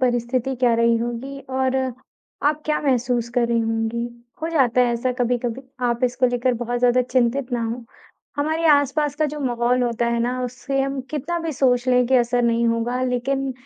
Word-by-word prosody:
परिस्थिति 250 +1 0
क्या 245 -1 +3
रही 230 0 +3
होगी 240 +4 -4 0.2
और 260 0 +1 0.7
आप 300 +1 +1
क्या 305 - +1
महसूस 245 -3 +1
कर 240 -1 +3
रही 235 0 +2
होंगी। 225 +1 -1 0.4
हो 325 - -1
जाता 255 -6 +3
है 240 -1 +3
ऐसा 250 +2 -1
कभी-कभी। 245 +1 -1 0.2
आप 240 +1 0
इसको 250 +1 +2
लेकर 245 0 +1
बहुत 245 +1 -2
ज़्यादा 250 +1 +3
चिंतित 250 +1 0
ना 235 -1 0
हों। 230 +2 -4 0.5
हमारे 315 +3 0
आसपास 290 0 +3
का 310 - +1
जो 300 - -6
माहौल 245 -1 +1
होता 235 0 0
है 235 0 0
ना, 250 +2 -1
उससे 270 +2 -3
हम 275 0 -1
कितना 310 +4 -2
भी 330 -1 -3
सोच 250 -2 +2
लें 250 -1 +4
कि 260 - +2
असर 245 0 +2
नहीं 235 0 +2
होगा 230 +2 -1
लेकिन 265 +2 -1
250 Hz, 190 wpm, -22 LUFS, 235-270 Hz, 0.7 s, लें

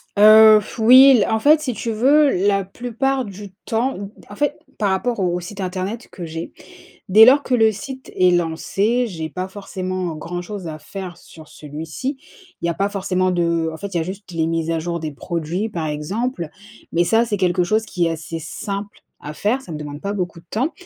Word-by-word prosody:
Heu, 215 +1 +8
f 215 - -10
oui 255 +5 +8
l - - +2
en 220 - +1
fait, 300 +6 +5
si 265 -5 -3
tu 230 +1 -4
veux, 275 +6 +4 0.2
la 195 -1 +2
plupart 250 +6 -2
du 200 0 -9
temps, 245 +4 0
m 200 0 -7
d - - -18
en 205 - -9
fait, 290 +3 -1 0.2
par 205 - +1
rapport 235 +4 -1
au 180 -2 0
site 190 +3 -9
internet 190 +5 -4
que 180 - -8
j'ai 165 +1 -6 0.6
dès 215 +3 +9
lors 275 +3 +6
que 255 - -1
le 220 -2 +4
site 260 +4 -8
est 185 0 +5
lancé, 195 +8 0
j'ai 160 -6 -5
pas 185 +3 -4
forcément 185 -3 -4
grand-chose 175 +3 -6
à 155 -1 -6
faire 175 +3 -8
sur 160 -3 -15
celui-ci. 160 - -6 0.5
Il - - 0
y - - 0
a 170 - -2
pas 200 +3 0
forcément 185 -2 0
de 170 -2 0
en - - -7
fait, 200 - -5
il 170 - +1
y - - +1
a - - 0
juste 190 +3 -7
les 165 -1 0
mises 165 0 -1
à 165 - 0
jour 170 +1 -3
des 155 -2 -4
produits, 170 +7 -3
par 165 -5 -3
exemple, 170 - -3 0.4
mais 175 +1 +3
ça 225 +5 +3
c'est 210 -3 -1
quelque 180 -1 +2
chose 215 +5 +1
qui 175 -2 0
est - - 0
assez 165 0 -5
simple 200 +5 -6 0.2
à 150 - -7
faire, 225 - 0
ça 170 - -10
ne - - -4
demande 145 -1 -7
pas 200 +3 -3
beaucoup 180 -4 -3
de 170 - -17
temps 260 +9 -1
190 Hz, 220 wpm, -20 LUFS, 170-220 Hz, 0.6 s, dès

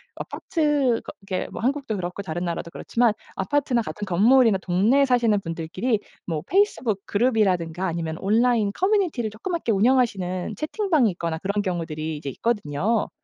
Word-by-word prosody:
아파트 295 -8 0
거 - - -7
그렇게 185 -2 -2
뭐 - - -6
한국도 265 -2 -1
그렇고 180 +1 -4
다른 175 0 -4
나라도 170 0 -4
그렇지만 235 +3 +1 0.2
아파트나 250 +3 0
같은 210 -1 -5
건물이나 220 +4 +5
동네에 215 +10 +3
사시는 235 -5 +2
분들끼리 175 +7 -2 0.3
뭐 160 -4 -2
페이스북 265 - +1
그룹이라든가 190 -7 +1
아니면 165 -2 -3
온라인 220 +1 +2
커뮤니티를 365 - +1
조그맣게 240 - -3
운영하시는 200 -4 +1
채팅방이 310 - +1
있거나 170 -2 -3
그런 200 +4 -1
경우들이 160 -4 -3
이제 145 -1 -5
있거든요. 205 - -1
210 Hz, 420 characters per minute, -24 LUFS, 175-250 Hz, 0.3 s, 건물이나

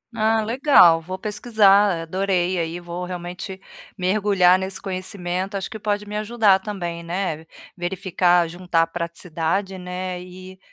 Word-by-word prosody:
Ah 220 0 +2
legal, 225 - +5
vou 185 +3 -6
pesquisar 205 -3 +3
adorei 185 0 0
aí, 165 +1 -3
vou 175 +1 -6
realmente 180 +2 -6 0.4
mergulhar 185 -1 +3
nesse 190 0 -5
conhecimento, 185 0 -4
acho 190 - -5
que 220 - -7
pode 205 0 -2
me 210 0 -7
ajudar 215 -3 +3
também, 175 -5 -5
né, 170 -2 -3 0.3
verificar, 175 -1 +1
juntar 170 -1 0
praticidade, 170 +3 -3
né 180 0 -5
e 185 +1 -12
185 Hz, 130 wpm, -22 LUFS, 175-200 Hz, 0.4 s, legal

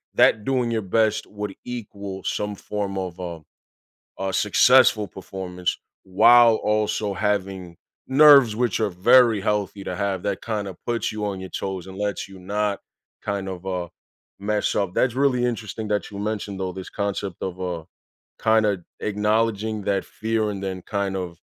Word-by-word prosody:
that 110 - +4
doing 125 -3 +1
your 115 -1 0
best 110 +2 +1
would 105 -1 -6
equal 100 -5 -6
some 105 0 -2
form 100 -1 -4
of 90 -2 -4
a 85 -3 -6 0.8
a 95 0 -2
successful 110 +2 +5
performance 90 -1 -4 0.3
while 115 +5 +6
also 105 -1 0
having 95 -3 -2 0.3
nerves, 135 -5 +7
which 120 -3 0
are 110 - +2
very 115 +4 +5
healthy 100 -1 -1
to - - -4
have, 95 -2 -2
that 100 -2 -2
kind 105 -3 -3
of 95 - -8
puts 120 -1 -1
you 105 -1 -3
on 100 -2 -3
your 95 -1 -8
toes 95 -2 -4
and 95 0 -9
lets 105 -1 -2
you 95 -1 -12
not 100 +2 -1 0.4
kind 100 -2 -3
of, 95 0 -7
uh, 90 -2 -2 0.5
mess 105 +1 0
up. 100 -3 -1
That's 125 -2 +2
really 130 -2 +2
interesting 110 -2 -3
that 105 -1 -1
you 100 - -8
mentioned, 105 -2 -3
though, 95 -1 -2
this 95 0 -8
concept 100 -3 -3
of, 95 -1 -4
uh, 90 -3 -3 0.6
kinda 105 -5 +2 0.2
acknowledging 105 +1 0
that 100 0 0
fear 110 -1 -1
and 100 -1 -5
then 95 -1 -3
kind 100 -1 -2
of 90 -3 -5
100 Hz, 165 wpm, -23 LUFS, 95-110 Hz, 0.8 s, nerves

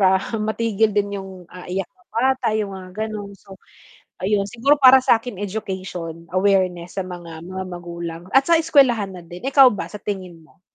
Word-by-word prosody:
para 190 -1 +5 0.2
matigil 220 0 +1
din 205 0 0
yung, 190 0 -9 0.2
ah, 180 -1 -10
iyak 185 +1 -2
na 365 - -30
bata 260 +2 +1
yung 205 -2 -2
mga 185 -1 -9 0.2
ganun. 205 -2 -7
So, 195 0 -14 0.7
ayun 200 +1 +1
siguro 275 +7 +2
para 260 0 +9
sakin 235 -3 +1
education 185 -5 -5
awareness 185 -2 +1
sa 190 - 0
mga 170 -2 -9
mga 190 +1 -5
magulang 170 -1 -6
at 270 0 +5
sa 335 - +6
eskwelahan 260 - +3
na 180 - -9
din. 175 +7 -10
Ikaw 270 -1 +7
ba? 205 - -4
Sa 210 - -10
tingin 185 -5 -6
mo? 160 +3 -25
195 Hz, 180 wpm, -21 LUFS, 180-225 Hz, 0.7 s, para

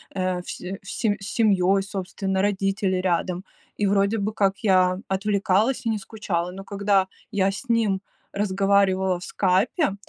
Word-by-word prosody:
э, 185 -1 -1
все 185 +2 -6
все 205 +1 -1
с 195 - -8
семьей, 195 -4 +3
собственно, 190 0 -3
родители 195 -1 0
рядом, 180 0 -1 0.3
и 205 - 0
вроде 200 +2 +2
бы 210 +2 -1
как 195 -2 +1
я 185 -3 +3
отвлекалась 200 +5 +1
и - - +1
не 220 - 0
скучала. 190 -4 -3
Но 195 +1 -8
когда 200 -1 +1 0.2
я 195 -1 +2
с 230 +6 -8
ним 215 -5 +1 0.3
разговаривала 195 -2 +2
в - - -10
"Скайпе", 195 - +1
195 Hz, 150 wpm, -24 LUFS, 190-205 Hz, 0.3 s, семьей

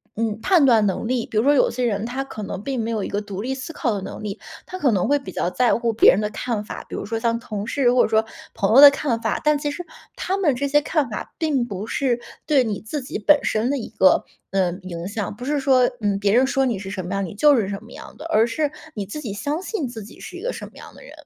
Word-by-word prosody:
嗯， 220 -1 -2
判 345 +1 +4
断 230 -5 +5
能 195 +3 -1
力， 245 -1 0
比 215 - -5
如 215 - +4
说 285 +3 +5
有 - - +3
些 250 +1 -1
人 210 -2 -1
他 255 +3 -3
可 220 -5 -8
能 195 -1 -5
并 260 +1 -2
没 230 - -2
有 220 -2 -1
一 - - -3
个 205 - -2
独 200 -2 -6
立 260 +4 -2
思 265 +4 -6
考 260 -7 -1
的 200 - -3
能 - - -7
力， 210 0 -5 0.3
他 370 - -7
可 285 -8 +2
能 190 -4 +1
会 290 - +3
比 275 - -8
较 - - -1
在 245 +5 +2
乎 235 -1 0
别 220 - +7
人 190 - +1
的 210 0 -1
看 215 0 -3
法， - - -8
比 - - -6
如 - - -4
说 225 +2 -3
像 230 0 0
同 210 -3 -5
事 245 +1 +2
或 250 - +5
者 - - 0
说 220 0 +3 0.3
朋 200 +3 +1
友 275 - +9
的 285 - +12
看 275 -5 -1
法， - - -1
但 300 0 +3
其 290 0 -2
实 350 +4 -6 0.3
他 380 - -2
们 330 -8 +2
这 280 +3 -1
些 295 +1 +3
看 300 -4 0
法 210 - -6
并 290 -7 0
不 205 -1 -6
是 255 -4 0 0.3
对 280 -4 +4
你 210 -3 -3
自 275 +7 -4
己 255 - -5
本 290 +8 +5
身 220 +3 +1
的 285 - 0
一 240 - -6
个， 185 - +3 0.3
呃， 190 -2 +1
影 170 -1 -6
响。 205 0 -4
不 245 - -7
是 290 +1 0
说 260 -2 +4
嗯， 200 -2 0
别 200 0 +2
人 250 +3 +5
说 270 0 +1
你 240 -5 0
是 190 0 -7
什 190 -3 -4
么 180 - -4
样， 195 0 -1
你 175 - -7
就 290 +7 +5
是 215 -6 0
什 200 +1 -5
么 225 - -15
样 - - -11
的， 300 - -9
而 225 -9 +3
是 290 +6 -1 0.2
你 205 -2 -4
自 205 +10 -7
己 230 -8 -5
相 285 - -3
信 380 - -3
自 225 -3 -8
己 210 - -14
是 360 - -9
一 355 - -8
个 - - -2
什 - - -7
么 - - -13
样 - - -12
的 - - -15
人。 - - -13
235 Hz, 320 characters per minute, -22 LUFS, 210-280 Hz, 0.3 s, 的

